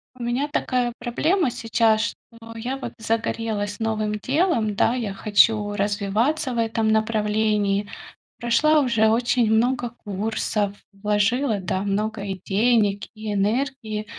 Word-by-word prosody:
У 245 - -8
меня 245 +4 0
такая 250 -4 0
проблема 285 +6 +1
сейчас, 225 -1 +2 0.3
что 230 0 -12
я, 250 +4 -3
вот, 270 - -6
загорелась 220 -2 -2
новым 215 -1 -1
делом, 255 - 0
да, 230 +4 +2
я 225 -6 -3
хочу 210 +1 +3
развиваться 210 +8 0
в - - -4
этом 225 -1 +1
направлении. 210 -2 +1 0.5
Прошла 300 +7 +3
уже 235 -6 +2
очень 235 0 +2
много 240 +2 +2 0.2
курсов, 205 0 -1 0.2
вложила, 210 +4 +1
да, 185 0 -2
много, 210 +1 -2
и 195 -2 -4
денег, 205 -1 +2
и 215 -1 -4
энергии, 215 +1 -1
220 Hz, 125 wpm, -23 LUFS, 210-240 Hz, 0.5 s, хочу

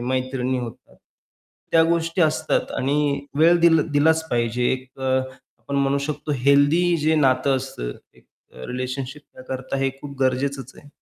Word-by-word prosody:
मैत्रिणी 130 0 -1
होत्या, 120 -2 -8 0.8
त्या 165 -1 +6
गोष्टी 165 +1 +1
असतात 155 0 0
आणि 140 +1 0 0.2
वेळ 170 +2 +5
दिल 165 -2 +5
दिलाच 160 +2 +2
पाहिजे, 120 +1 0
एक 130 0 -5
अ, 130 0 +1 0.4
आपण 140 - -5
म्हणू 140 0 +2
शकतो 150 0 -3
हेल्दी 150 +5 +4
जे 155 +1 +1
नातं 135 -2 +2
असतं 125 - -5 0.2
एक - - -23 0.3
अ, 65 - -9
रिलेशनशिप 130 +3 -5
त्या - - -13
करता 130 +1 -4
हे 135 0 0
खूप 140 -1 -9
गरजेचंच 135 0 -1
आहे. 145 - -15
140 Hz, 155 wpm, -22 LUFS, 130-155 Hz, 0.8 s, त्या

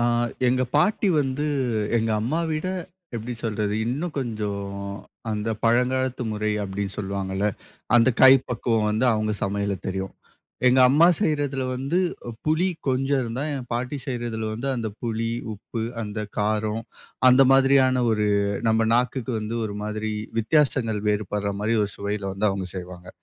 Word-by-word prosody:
அ - - +1 0.5
எங்க 130 +1 +2
பாட்டி 205 +5 +3
வந்து 140 +2 -1 0.5
எங்க 115 0 +1
அம்மாவிட, 155 +6 -1 0.5
எப்டி 120 +2 -5
சொல்றது 105 -2 -1
இன்னும் 150 +7 -3
கொஞ்சம் 105 -5 -3 0.7
அந்த 105 +1 -2 0.2
பழங்காலத்து 125 +2 +2
முறை 105 0 -1
அப்டின்னு 100 0 -4
சொல்லுவாங்கல, 95 0 -2 0.5
அந்த 120 +2 +5
கைப்பக்குவம் 125 -4 +4
வந்து 110 +4 +1
அவங்க 110 0 0
சமையல்ல 100 0 -1
தெரியும். 95 0 -3 0.5
எங்க 125 +1 +5
அம்மா 150 +6 +6
செய்யறதுல 145 -7 0
வந்து 140 +7 0 0.5
புளி 160 +4 +2 0.2
கொஞ்சம் 135 +1 +1
இருந்தா, 120 +3 -3
என் 130 -3 -6
பாட்டி 125 +4 -2
செய்யறதுல 120 -3 -3
வந்து 125 +5 -3
அந்த 115 -2 -2
புளி, 115 0 -1 0.2
உப்பு, 110 +3 -6 0.2
அந்த 105 0 -4 0.2
காரம், 110 +1 0 0.5
அந்த 130 +2 +7
மாதிரியான 135 -1 +4
ஒரு 105 -1 +1 0.4
நம்ம 110 0 +3
நாக்குக்கு 125 +1 0
வந்து 110 +2 -3
ஒரு 105 -1 -4
மாதிரி 110 +1 -3 0.3
வித்தியாசங்கள் 115 -3 +2
வேறுபடுற 105 -1 -1
மாதிரி 110 +2 +1
ஒரு 100 - -2
சுவையில 100 -1 -3
வந்து 105 +2 +1
அவங்க 95 -1 -3
செய்வாங்க. 90 0 -8
115 Hz, 135 wpm, -24 LUFS, 105-130 Hz, 0.7 s, அந்த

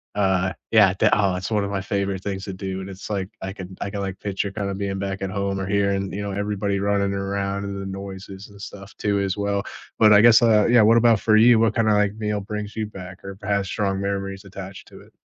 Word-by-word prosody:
uh, 95 -2 +1 0.2
yeah, 100 -4 +6
they - - +4
aw, 100 -3 +2
that's 90 +3 -4
one 105 -2 +1
of - - -4
my 100 -1 -2
favorite 100 -1 -2
things 95 -1 -4
to 95 - -5
do, 95 0 -5
and 95 +1 -7
it's 95 0 -9
like 100 -3 -2
I 95 - -4
can 95 -2 -9
I 100 - -2
can, 100 0 -5
like, 95 -1 -4
picture 100 0 -2
kinda 100 -1 -3
being 100 0 -3
back 95 0 -4
at 95 - -2
home 100 0 -2
or 95 - -2
hearing, 100 -1 0
you 100 - -3
know, 100 -1 -4
everybody 100 0 -1
running 100 0 +1
around 100 0 -2
and 100 0 -5
the - - -6
noises 95 0 -8
and 100 -1 -15
stuff 100 0 -10
too 100 -1 0
as 95 -1 -1
well? 100 -1 -1 0.4
But 110 -1 +7
I 105 - +7
guess, 115 -1 +7
uh 110 -3 +4
yeah. 120 -1 +6
What 110 +2 +5
about 115 -2 +4
for 110 0 +3
you? 115 +1 +6
What 115 0 +2
kind 115 -2 +2
of 105 - +4
like 105 -1 +2
meal 105 -1 -2
brings 105 +1 -6
you 110 - -1
back 95 -2 -10
or 100 0 -7
perhaps 100 -1 -1
strong 100 -2 -1
memories 100 0 -3
attached 95 0 -9
to - - -14
it? - - -19
100 Hz, 255 wpm, -23 LUFS, 95-105 Hz, 0.4 s, But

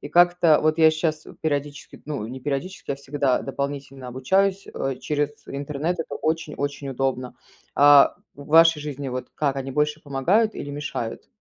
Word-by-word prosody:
И - - -7
как-то 175 -2 +5
вот 155 +1 +2
я 160 0 +7
сейчас 155 -1 -2 0.2
периодически, 145 -2 -3
ну, 145 -7 -4
не 130 - -7
периодически, 145 +8 -4
я 135 - -5
всегда 140 -2 0
дополнительно 135 -1 -5
обучаюсь, 190 +10 +1
э, 135 0 -2
через 145 -1 -1 0.2
интернет. 145 +5 -3
Это 165 - -4
очень 160 -1 -2
очень 140 0 -4
удобно. 130 -1 -2 0.4
А 145 0 +7 0.2
в 140 0 -12
вашей 165 0 +6
жизни 145 -2 -5
вот 130 0 -5
как 140 -3 0
они 135 0 -4
больше 150 +2 0
помогают 175 - +1
или 145 - -6
мешают? 145 -5 -5
145 Hz, 165 wpm, -24 LUFS, 135-155 Hz, 0.4 s, я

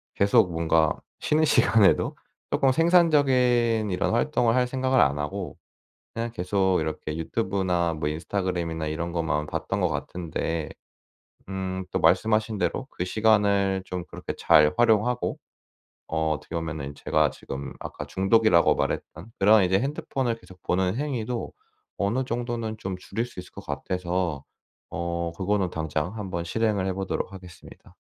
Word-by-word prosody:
계속 100 -1 +4
뭔가 80 -1 +2 0.2
쉬는 155 +1 +2
시간에도 115 -7 +4 0.3
쪼금 135 -1 +3
생산적인 130 - +3
이런 90 +2 0
활동을 120 -1 +2
할 125 -1 +3
생각을 130 0 +1
안 70 +1 +3
하고 95 +5 -4 0.6
그냥 115 0 -3
계속 95 -3 +1
이렇게 80 0 -4
유튜브나 90 -2 0
뭐 75 -1 -2
인스타그램이나 85 -1 -2
이런 85 +2 -3
것만 75 -3 -1
봤던 - - -3
것 - - +2
같은데 80 -2 -3 0.8
음. 95 -1 -4
또 - - -1
말씀하신 110 +5 +2
대로 90 +9 -1
그 90 - -4
시간을 100 -2 +2
좀 90 -1 -4
그렇게 - - -6
잘 75 0 +5
활용하고 120 +1 +2 0.7
어 80 -1 0
어떻게 75 - -5
보면은 80 -4 -4
제가 - - +2
지금 70 +1 -7
아까 - - -7
중독이라고 95 -2 +4
말했던 90 +8 -3
그런 105 +1 +6
이제 95 +1 +2
핸드폰을 135 -3 -2
계속 95 -5 -17
보는 95 +1 +1
행위도 125 -5 -3 0.4
어느 115 +7 0
정도는 115 -2 -3
좀 95 -3 -5
줄일 100 +5 -3
수 120 -6 -10
있을 90 - -10
것 - - -11
같아서 90 -5 -2 0.5
어. 85 0 -3
그거는 95 -1 0
당장 80 +2 -2
한번 90 -5 -4
실행을 105 0 0
해 95 - -1
보도록 95 0 -3
하겠습니다. 90 -2 -13
95 Hz, 320 characters per minute, -26 LUFS, 85-115 Hz, 0.8 s, 그런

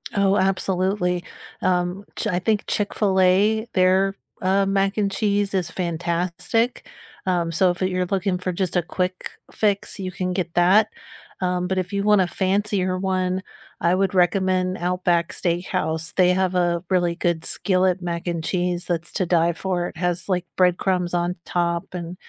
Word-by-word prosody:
Oh, 200 0 +3
absolutely, 185 -1 0 0.4
um, 180 +2 0
Ch - - -2
I 180 -3 0
think 210 +2 0
Chick-fil-A, 205 +1 +2
their, 190 +1 +3 0.3
uh, 195 +1 +2
mac 195 0 +1
and 200 -2 +1
cheese 205 0 0
is 185 -3 0
fantastic, 175 +7 -1 0.4
um, 175 -3 0
so 180 +2 +3
if 175 - -8
you're 185 -1 0
looking 190 0 -1
for 185 0 -3
just 180 0 -1
a - - +3
quick 180 +2 -3 0.2
fix, 205 -1 0
you 185 -1 -4
can 185 0 -2
get 180 -2 -2
that, 190 +5 +5 0.5
um, 180 -1 0
but 190 +1 -1
if 185 -1 -2
you 200 0 -1
want 210 -1 +5
a 185 - +1
fancier 190 0 0
one, 185 0 -1 0.4
I 170 - +3
would 195 +1 +1
recommend 185 +1 +2
Outback 175 -1 0
Steakhouse, 170 -2 -2
they 180 -1 +5
have 185 0 0
a 175 -1 +1
really 175 -2 +1
good 170 -2 -1
skillet 185 +1 +2
mac 170 0 -4
and 170 -1 -1
cheese 180 0 -1
that's 175 -1 -2
to 190 - 0
die 170 -1 +3
for, 175 0 -2
it - - -14
has, 180 +2 -1
like, 180 -2 0
bread 180 -1 +3
crumbs 180 -2 0
on 175 0 0
top 170 0 -2
and 175 -1 -5
185 Hz, 165 wpm, -23 LUFS, 175-195 Hz, 0.5 s, that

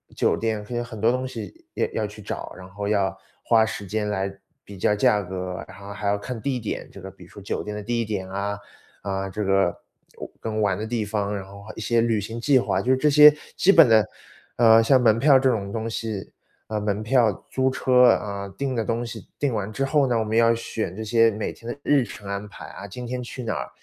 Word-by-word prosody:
酒 - - +2
店， 110 -2 -2
它 120 - -5
有 120 - -1
很 115 -3 -9
多 115 +2 +3
东 130 +1 -2
西 130 - -8
要 - - +1
要 110 -2 -1
去 105 0 -12
找， - - -6
然 90 - -10
后 100 +2 -5
要 100 -2 +1 0.3
花 115 -1 +4
时 105 -2 -4
间 105 +2 -2
来 100 -1 -2 0.3
比 100 -2 -11
较 105 - +2
价 105 0 +3
格， 90 0 -5
然 95 0 -13
后 100 +1 -9
还 105 0 -4
要 100 0 +2
看 115 +2 -6
地 135 -3 -1
点。 110 - -5
这 100 - -12
个 95 - -8
比 95 -1 -16
如 90 - -16
说 - - -12
酒 100 - -4
店 105 0 -5
的 105 - -6
地 115 +1 -1
点 100 -4 -4
啊， 100 +1 -3 0.5
啊， 95 -1 -3
这 105 +2 -3
个 95 0 +3 0.5
玩 - - -8
跟 110 -1 -3
玩 100 -3 +2
的 110 - -4
地 110 -2 -1
方， 105 -1 -2
然 95 - -7
后 100 +1 -12
还 110 - -9
一 - - -8
些 115 +1 +2
旅 115 -2 +1
行 115 +3 -6
计 140 0 +4
划， - - 0
就 130 +1 +3
这 150 +3 +2
些 150 0 +9 0.2
基 195 - +5
本 165 -7 +8
的， 110 -3 +5 0.5
呃， 115 -1 +7
像 130 +2 +5
门 110 -2 +4
票 135 +2 +6
这 135 0 +3
种 100 -4 -1
东 115 +1 -3
西 110 -3 -4 0.4
呃， 110 - -3
门 105 0 -1
票、 115 0 +3 0.2
租 130 0 +1
车， 125 -1 +4
啊， 100 -3 -1
订 135 -2 -2
的 115 - 0
东 115 +2 -1
西 110 -5 -9
订 140 -4 0
完 105 -1 -3
之 135 +5 -1
后 140 0 +2
呢， 120 -3 +1
我 110 - -1
们 110 - -2
要 115 0 +5
选 115 -4 -4
这 110 +4 -6
些 115 +1 +4
每 105 0 -4
天 115 +1 -7
的 - - -8
日 145 -3 +3
程 100 -3 -10
安 100 +1 -4
排 - - -11
啊， 100 - -9
今 125 +5 -8
天 125 +1 -3
去 125 +1 -7
哪 115 - -2
儿， - - -4
110 Hz, 270 characters per minute, -24 LUFS, 100-120 Hz, 0.5 s, 些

